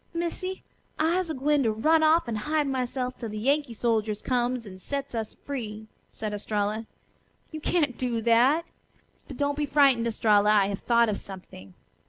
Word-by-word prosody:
Missy, 355 Hz, +2 st, -3 dB, 0.3 s
I'se 335 Hz, +3 st, +1 dB
a 315 Hz, -, -2 dB
gwine 290 Hz, +2 st, +2 dB
to 225 Hz, -4 st, +2 dB
run 310 Hz, +9 st, +3 dB
off 315 Hz, -1 st, +4 dB
an' 230 Hz, -, -2 dB
hide 300 Hz, +8 st, 0 dB
myself 255 Hz, -1 st, -2 dB
'til 230 Hz, -, -5 dB
the 215 Hz, -, -6 dB
Yankee 275 Hz, +2 st, 0 dB
soldiers 220 Hz, -2 st, 0 dB
comes 245 Hz, -1 st, 0 dB
and 185 Hz, -2 st, -11 dB
sets 280 Hz, +5 st, -4 dB
us 225 Hz, -2 st, -4 dB
free," 220 Hz, -6 st, -5 dB, 0.3 s
said 215 Hz, -1 st, -5 dB
Estralla. 210 Hz, +1 st, -2 dB, 0.6 s
"You 310 Hz, -1 st, -6 dB
can't 295 Hz, -7 st, 0 dB
do 245 Hz, -3 st, -1 dB
that. 245 Hz, +8 st, +4 dB, 0.6 s
But 275 Hz, -, -9 dB
don't 285 Hz, 0 st, 0 dB
be 295 Hz, -, 0 dB
frightened, 275 Hz, -5 st, +4 dB
Estralla. 210 Hz, -2 st, +3 dB
I 210 Hz, -2 st, +5 dB
have 200 Hz, -, -3 dB
thought 235 Hz, -1 st, +3 dB
of 210 Hz, -2 st, -1 dB
something. 140 Hz, -, -11 dB
245 Hz, 175 wpm, -27 LUFS, 215-290 Hz, 0.6 s, I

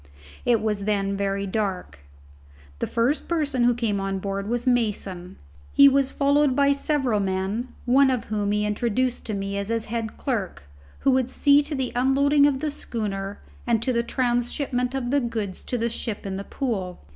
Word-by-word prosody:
It 235 Hz, -3 st, +3 dB
was 210 Hz, -2 st, -1 dB
then 200 Hz, -2 st, 0 dB
very 200 Hz, 0 st, -1 dB
dark. 190 Hz, -, -3 dB, 0.8 s
The -, -, -1 dB
first 240 Hz, +6 st, 0 dB
person 290 Hz, -7 st, +1 dB
to 245 Hz, -, +3 dB
come 205 Hz, -2 st, 0 dB
on 195 Hz, 0 st, -2 dB
board 195 Hz, +1 st, -3 dB
was 240 Hz, +1 st, -1 dB
Mason. 200 Hz, -7 st, -1 dB, 0.4 s
He 280 Hz, -, +8 dB
was 275 Hz, -1 st, +3 dB
followed 285 Hz, -1 st, +2 dB
by 280 Hz, 0 st, +4 dB
several 275 Hz, -5 st, 0 dB
men, 195 Hz, +5 st, -1 dB, 0.2 s
one 265 Hz, +2 st, +5 dB
of 255 Hz, -4 st, 0 dB
whom 205 Hz, -1 st, -1 dB
he 210 Hz, 0 st, +1 dB
introduced 240 Hz, +4 st, -1 dB
to 215 Hz, -, -2 dB
me 195 Hz, 0 st, -3 dB
as 200 Hz, -, -3 dB
his 230 Hz, 0 st, -1 dB
head 225 Hz, -1 st, -4 dB
clerk, 210 Hz, -, -3 dB, 0.4 s
who 275 Hz, -, +3 dB
would 260 Hz, -1 st, +2 dB
see 285 Hz, +2 st, +4 dB
to 295 Hz, +1 st, -4 dB
the 265 Hz, -2 st, -2 dB
unloading 280 Hz, +3 st, +4 dB
of 275 Hz, -2 st, -1 dB
the 305 Hz, -1 st, -1 dB
schooner 205 Hz, -7 st, -4 dB, 0.3 s
and 235 Hz, -2 st, +3 dB
to 255 Hz, -, 0 dB
the 235 Hz, -, +2 dB
transhipment 245 Hz, +1 st, -1 dB
of 250 Hz, -2 st, -2 dB
the 285 Hz, -, +3 dB
goods 225 Hz, -6 st, -4 dB
to 250 Hz, -, -2 dB
the 235 Hz, 0 st, 0 dB
ship 225 Hz, -2 st, -4 dB
in 195 Hz, -1 st, -3 dB
the 195 Hz, +1 st, -5 dB
Pool. 195 Hz, -9 st, -3 dB
235 Hz, 185 wpm, -24 LUFS, 200-265 Hz, 0.8 s, He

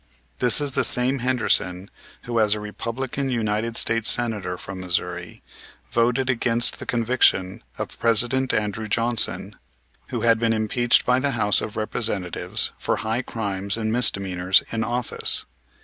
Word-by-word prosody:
This 125 Hz, +2 st, +3 dB
is 145 Hz, -1 st, -1 dB
the -, -, +1 dB
same 130 Hz, +2 st, +4 dB
Henderson, 115 Hz, -7 st, 0 dB, 0.3 s
who, 120 Hz, -2 st, -1 dB
as 105 Hz, -1 st, +3 dB
a -, -, -5 dB
Republican 120 Hz, +6 st, -4 dB
United 115 Hz, -1 st, -1 dB
States 115 Hz, -1 st, +2 dB
Senator 105 Hz, -7 st, 0 dB
from 95 Hz, +1 st, -7 dB
Missouri, 90 Hz, -1 st, -4 dB, 0.5 s
voted 120 Hz, +3 st, +1 dB
against 120 Hz, -2 st, +1 dB
the -, -, -8 dB
conviction 115 Hz, -4 st, +1 dB, 0.2 s
of -, -, -6 dB
President 120 Hz, +3 st, +2 dB
Andrew 110 Hz, 0 st, -2 dB
Johnson, 115 Hz, +2 st, 0 dB, 0.5 s
who 120 Hz, -, -4 dB
had 115 Hz, -1 st, +3 dB
been 115 Hz, -1 st, +1 dB
impeached 115 Hz, +3 st, +2 dB
by 125 Hz, +1 st, +3 dB
the 140 Hz, +1 st, 0 dB
House 105 Hz, -2 st, +3 dB
of 105 Hz, -, -6 dB
Representatives 110 Hz, -5 st, -1 dB
for -, -, 0 dB
high 110 Hz, +3 st, -2 dB
crimes 100 Hz, -4 st, -3 dB
and 110 Hz, -1 st, -2 dB
misdemeanors 95 Hz, -5 st, +2 dB
in 115 Hz, -1 st, -1 dB
office. 120 Hz, +1 st, 0 dB
115 Hz, 145 wpm, -23 LUFS, 105-120 Hz, 0.5 s, same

